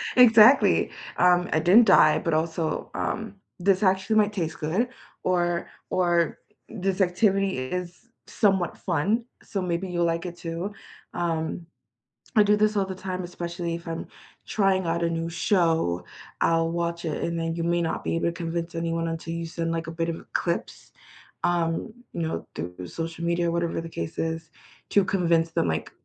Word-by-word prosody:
exactly, 235 +1 +7 0.3
um, 180 0 +4
I 155 - +3
didn't 190 +8 +6
die, 155 -6 +6
but, 165 - -1
also, 160 0 -1
um, 220 -1 -3 0.2
this 190 +2 +2
actually 190 +3 +2
might 210 0 +3
taste 165 -5 -3
good 185 +11 0 0.3
or 175 -1 0 0.2
or 175 -3 +1 0.3
this 195 -2 -1
activity 195 - +2
is 180 - -5 0.2
somewhat 195 -5 +1
fun, 195 +7 0 0.2
so 195 - -3
maybe 180 +1 -2
you'll 175 -1 +1
like 165 +1 -1
it 175 -1 -6
too. 170 +3 -4 0.4
Um, 165 0 -2 0.7
I 210 - +7
do 205 0 +4
this 215 0 +2
all 195 - +2
the 190 -1 -6
time, 185 -1 -4
especially 170 -1 -4
if 170 0 -9
I'm 165 0 -4 0.4
trying 195 -3 +2
out 170 +1 0
a 170 - +2
new 165 0 -2
show, 165 - +1 0.4
I'll 165 0 +3
watch 170 0 -2
it 155 -2 -2
and 170 0 -1
then 165 0 -2
you 165 - -2
may 170 0 +1
not 165 - -2
be - - -1
able 165 - 0
to 170 - +1
convince 170 0 -4
anyone 165 0 -1
until 165 0 -4
you 170 0 -3
send, 165 0 -3
like, 165 0 -2
a - - -4
bit 165 0 -2
of 165 - -5
clips, 170 -1 -2 0.5
um, 170 +4 0 0.2
you 170 - -3
know, 160 - -3
through 90 +2 -6
social 165 - -5
media 170 0 +1
or - - -1
whatever 170 -1 -1
the 165 - -7
case 85 - -5
is, 160 0 -3 0.4
to 200 -2 +4
convince 170 -4 +2
them, 85 - +1
like, 80 0 -2
170 Hz, 175 wpm, -26 LUFS, 165-185 Hz, 0.7 s, exactly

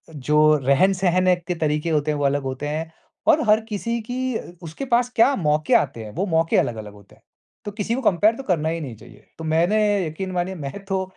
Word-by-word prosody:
जो 150 +2 +3
रहन-सहन 185 +5 +3
के 180 - -1
तरीके 150 0 -1
होते 150 0 +1
हैं 150 - -2
वो 140 - 0
अलग 140 0 +1
होते 135 +2 -4
हैं। 160 +2 -4 0.4
और 315 -1 +5
हर 215 +1 +6
किसी 230 +3 -2
की 250 - -3 0.5
उसके 165 - -6
पास 245 +1 +3
क्या 265 +4 +4
मौके 150 -3 +1
आते 115 - +1
हैं, 105 - -9
वो 190 +4 -1
मौके 165 -1 +1
अलग-अलग 110 -3 -2
होते 100 -1 -18
हैं, - - -29 0.4
तो 205 - -4
किसी 215 +3 -2
को 265 - -3
कंपेयर 215 +1 +3
तो 270 - -8
करना 160 -6 0
ही 165 +1 -2
नहीं 125 -6 -7
चाहिए। 115 - -17
तो - - -6
मैंने 195 +4 +2
यकीन 185 +5 -5
मानिए 180 +1 -2
मैं 155 +6 -7
तो 190 -1 -1
165 Hz, 215 wpm, -22 LUFS, 150-200 Hz, 0.5 s, हर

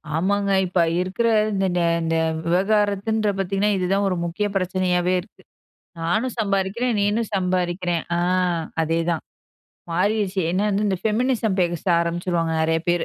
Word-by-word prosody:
ஆமாங்க. 200 +4 0 0.2
இப்ப 180 0 -1 0.2
இருக்கிற 195 +6 -1 0.3
இந்த 195 0 0
நே 170 - +2 0.2
இந்த 165 0 0 0.3
விவகாரத்துன்ற 205 +3 +1
பாத்தீங்கன்னா, 195 +2 0
இது 180 - -1
தான் 200 0 +1
ஒரு 185 - -1
முக்கிய 190 +5 -1
பிரச்சனையாவே 185 -1 +1
இருக்கு. 190 -1 -20 0.6
"நானும் 220 +10 -1
சம்பாதிக்கிறேன் 205 +3 0
நீனும் 210 +2 0
சம்பாதிக்கிற." 180 -2 -1
ஆ - - +1 0.6
அதே 165 +1 0
தான் 165 - -2 0.7
மாறிருச்சு. 200 +1 0
என்ன 185 +2 0
வந்து 205 +1 0
இந்த 190 - 0
ஃபெமினிசம் 220 -2 0
பேச 175 -2 0 0.2
ஆரம்பிச்சுருவாங்க. 170 -1 -1
நிறைய 160 0 +2
பேரு.பி 175 -1 +2
190 Hz, 140 wpm, -22 LUFS, 175-205 Hz, 0.7 s, நே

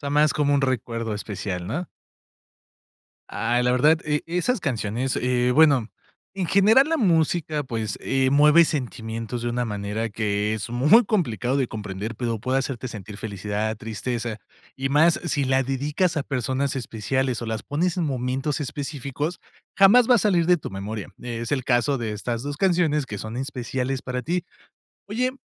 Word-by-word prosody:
sea, 140 -1 -4
más 150 +1 +3
como 145 -1 +2
un 140 - +3
recuerdo 115 -4 -2
especial, 95 -4 -4
¿no? 155 - -3 1.4
Ay, 120 +2 0
la 125 - +3
verdad, 150 +6 +4
e 150 -1 0
esas 180 +7 0
canciones, 120 -1 -2
eh, 125 0 +1
bueno, 140 -5 +5 0.5
en 190 -3 -2
general, 220 - +5
la 325 - +1
música, 160 - +1
pues, 110 -4 -3
eh, 135 -1 +1
mueve 150 +4 +6
sentimientos 115 -5 -4
de 120 - -1
una 120 +1 -1
manera 105 +1 -3
que 105 0 -1
es 110 +1 -5
muy 150 - +5
complicado 130 - 0
de 135 -3 +1
comprender, 105 +1 -5
pero 115 -1 -2
puede 130 +4 0
hacerte 130 -2 -3
sentir 105 -3 -8
felicidad, 105 +1 -3
tristeza, 115 +1 -4 0.4
y 135 0 -2
más 160 +4 +4
si 150 -4 0
la 130 0 +2
dedicas 150 +7 0
a 150 - +1
personas 135 0 -1
especiales 125 +1 -2
o - - -4
las 110 -1 -3
pones 170 +5 -1
en 175 - 0
momentos 135 +1 -2
específicos, 145 +2 -4 0.4
jamás 230 +5 +6
va 250 - +7
a - - +5
salir 180 -5 +2
de 180 0 +5
tu 155 - -7
memoria. 100 +2 -5
Eh, 120 -2 -5
es 115 - -4
el 130 -3 0
caso 130 +3 +2
de 115 -2 -3
estas 115 +4 -4
2 145 0 -4
canciones 165 -5 +2
que 105 -4 -6
son 110 +3 -6
especiales 130 0 -3
para 125 0 -3
ti. 175 +7 -1 0.6
Oye, 245 +5 0
130 Hz, 170 wpm, -24 LUFS, 115-150 Hz, 1.4 s, va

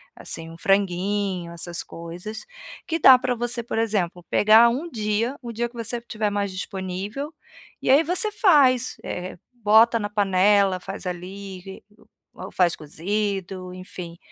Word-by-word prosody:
assim, 165 0 -7
um 165 - -11
franguinho, 195 -1 0
essas 170 0 -5
coisas, 175 +6 -8 0.4
que 330 - 0
dá 265 -3 +9
pra 250 -1 -1
você, 240 0 -2
por 230 - -4
exemplo, 190 -6 -1
pegar 220 +3 +6
um 280 +9 -3
dia, 225 +1 -1
o 235 - -6
dia 235 +1 -2
que 240 - -21
você 230 +1 -3
estiver 215 -3 -3
mais 200 -1 -1
disponível, 195 - -5 0.5
e - - -2
aí 280 - +7
você 365 +6 +1
faz, 275 - +4
eh, 180 0 -5 0.2
bota 230 0 +4
na 205 - -3
panela, 200 -1 +3
faz 195 +1 -7
ali, 190 +1 -7 0.5
ou - - -8
faz 175 -2 +2
cozido, 185 +3 -3
enfim, 180 -2 -8
205 Hz, 145 wpm, -24 LUFS, 185-235 Hz, 0.5 s, dá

